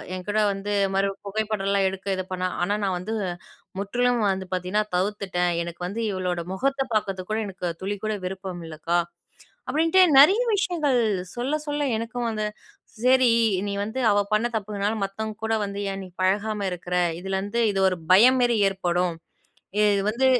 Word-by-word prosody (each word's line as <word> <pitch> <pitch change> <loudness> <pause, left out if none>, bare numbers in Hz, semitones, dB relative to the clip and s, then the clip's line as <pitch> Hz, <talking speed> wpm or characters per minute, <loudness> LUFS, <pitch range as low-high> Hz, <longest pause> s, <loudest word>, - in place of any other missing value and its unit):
என்கூட 205 +3 -3
வந்து, 200 +1 -3 0.2
மறுபடியும் 195 +1 -1
புகைப்படம்லாம் 200 -2 0
எடுக்க 190 +1 -8
இது 185 - -3
பண்ணா. 185 0 -1
ஆனா 200 +4 +1
நான் 190 -2 0
வந்து, 215 +5 -4 0.6
முற்றிலும் 245 +4 +1
வந்து 190 -1 -4
பார்த்தீங்கன்னா, 185 +3 0
தவிர்த்துட்டேன். 185 -2 0
எனக்கு 170 +1 -8
வந்து 215 +5 -4
இவளோட 180 -2 -2
முகத்த 270 +7 0
பார்க்கறதுக்கு 195 -2 -2
கூட, 215 - 0
எனக்கு 185 -2 -5
துளி 200 +2 -2
கூட 215 0 0
விருப்பம் 185 -2 -5
இல்லக்கா" 165 +2 -1 0.7
அப்படின்ட்டு 325 +7 +3 0.2
நெறைய 375 +10 +7 0.2
விஷயங்கள், 310 -10 +1 0.3
சொல்ல, 250 +4 -2
சொல்ல 290 0 -1
எனக்கும் 235 +1 -3
வந்து, 215 -1 -2 0.6
"சரி. 255 -1 +5 0.4
நீ 200 - -2
வந்து 220 +5 -4
அவ 205 - +3
பண்ண 220 +3 +3
தப்புனால 205 0 -1
மத்தவங்க 215 +2 -4
கூட 225 - 0
வந்து 200 0 -5
ஏன் 195 0 -5
நீ 185 - -12
பழகாம 205 +2 0
இருக்குற? 180 0 -4 0.2
இதிலருந்து 195 +5 -2
இது 195 - -1
ஒரு 185 - -3 0.2
பயம் 250 +7 +7
மேரி 240 -2 +3
ஏற்படும். 180 -2 -1 0.7
இது 205 -2 +3
வந்து 240 +5 +1
200 Hz, 155 wpm, -25 LUFS, 185-225 Hz, 0.7 s, நெறைய